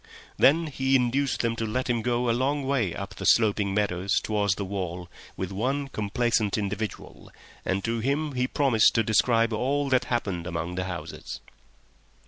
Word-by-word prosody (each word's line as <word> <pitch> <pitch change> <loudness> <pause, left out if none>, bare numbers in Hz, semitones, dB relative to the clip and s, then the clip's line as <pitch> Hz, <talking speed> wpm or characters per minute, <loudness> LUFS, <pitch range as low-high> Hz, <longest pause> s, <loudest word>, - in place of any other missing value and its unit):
Then 165 +5 +4
he 135 -3 0
induced 130 +2 +1
them 115 -1 0
to 115 - -1
let 130 +4 -2
him 120 -2 0
go 120 +1 0
a - - +3
long 135 +3 0
way 125 -10 0
up 100 +2 -6
the - - -7
sloping 105 -3 +3
meadows 100 -1 +1
towards 105 -3 0
the 100 - -4
wall 90 -2 -4 0.3
with 95 0 -4
one 135 +8 -1
complaisant 110 -1 0
individual, 105 +1 -5 0.3
and 95 +1 -1
to 115 +2 -1
him 140 +6 0
he 125 -1 0
promised 130 -6 +3
to 115 - +3
describe 115 +1 +2
all 140 +5 0
that 130 -1 +2
happened 100 -8 -2
among 85 +1 -3
the 90 +1 -2
houses. 85 -4 -6
115 Hz, 170 wpm, -26 LUFS, 100-130 Hz, 0.3 s, Then